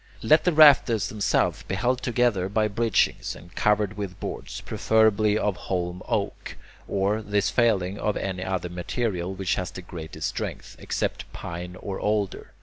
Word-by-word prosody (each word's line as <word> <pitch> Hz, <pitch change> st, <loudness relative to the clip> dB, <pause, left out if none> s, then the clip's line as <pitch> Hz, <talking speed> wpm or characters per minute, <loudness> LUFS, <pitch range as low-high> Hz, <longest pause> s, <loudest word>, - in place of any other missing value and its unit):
Let 155 Hz, +8 st, +5 dB
the 180 Hz, -, +4 dB
rafters 140 Hz, -, +6 dB
themselves 105 Hz, -1 st, +1 dB
be 95 Hz, -, -4 dB
held 125 Hz, +5 st, 0 dB
together 120 Hz, -7 st, +1 dB
by 110 Hz, +1 st, +2 dB
bridgings, 115 Hz, +1 st, +1 dB
and 85 Hz, +1 st, -14 dB
covered 105 Hz, -1 st, +1 dB
with 100 Hz, -3 st, -5 dB
boards, -, -, -5 dB
preferably 110 Hz, -1 st, +2 dB
of 105 Hz, -3 st, 0 dB
holm 90 Hz, 0 st, -3 dB
oak, -, -, -3 dB, 0.3 s
or, 100 Hz, +2 st, 0 dB
this 105 Hz, -1 st, 0 dB
failing, 100 Hz, -5 st, +2 dB
of 105 Hz, -, 0 dB
any 95 Hz, -1 st, -3 dB
other 95 Hz, -2 st, -2 dB
material 90 Hz, +1 st, -2 dB
which 95 Hz, 0 st, -1 dB
has 90 Hz, -, -2 dB
the 90 Hz, -, -9 dB
greatest 80 Hz, -3 st, -5 dB
strength, -, -, -5 dB
except -, -, -3 dB
pine 90 Hz, +1 st, -6 dB
or 95 Hz, +1 st, -5 dB
alder. 105 Hz, -2 st, -1 dB
100 Hz, 155 wpm, -25 LUFS, 90-110 Hz, 0.3 s, rafters